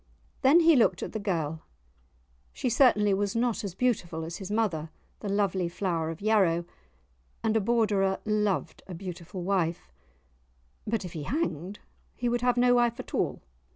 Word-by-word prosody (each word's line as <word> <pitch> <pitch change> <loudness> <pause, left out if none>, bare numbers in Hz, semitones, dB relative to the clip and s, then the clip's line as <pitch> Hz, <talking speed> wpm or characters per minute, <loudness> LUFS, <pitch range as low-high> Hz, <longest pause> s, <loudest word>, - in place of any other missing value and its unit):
Then 295 +6 +6
he 330 -1 +6
looked 240 - +3
at - - -5
the 220 - -4
girl; 165 -6 -2 0.9
she - - -2
certainly 210 -5 +4
was 200 +1 -1
not 235 -1 0
as 195 -3 -5
beautiful 185 -10 -1
as 165 +1 -6
his 195 -1 -7
mother, 195 -8 -1 0.3
the 205 - -5
lovely 195 -3 0
Flower 170 -3 -2
of 165 +2 -7
Yarrow; 190 -6 +2 0.8
and 225 0 +1
a 220 - +3
Borderer 205 -3 +1
loved 210 -2 0
a 185 - -7
beautiful 180 0 -7
wife. 170 - -1 1.0
But 220 -2 -1
if 175 - -8
he 160 - -5
hanged 195 - -3 0.4
he 245 - -2
would 240 0 0
have 245 0 +2
no 245 0 +5
wife 240 0 +2
at 255 - -8
all! - - -1
200 Hz, 165 wpm, -28 LUFS, 175-230 Hz, 1.0 s, Then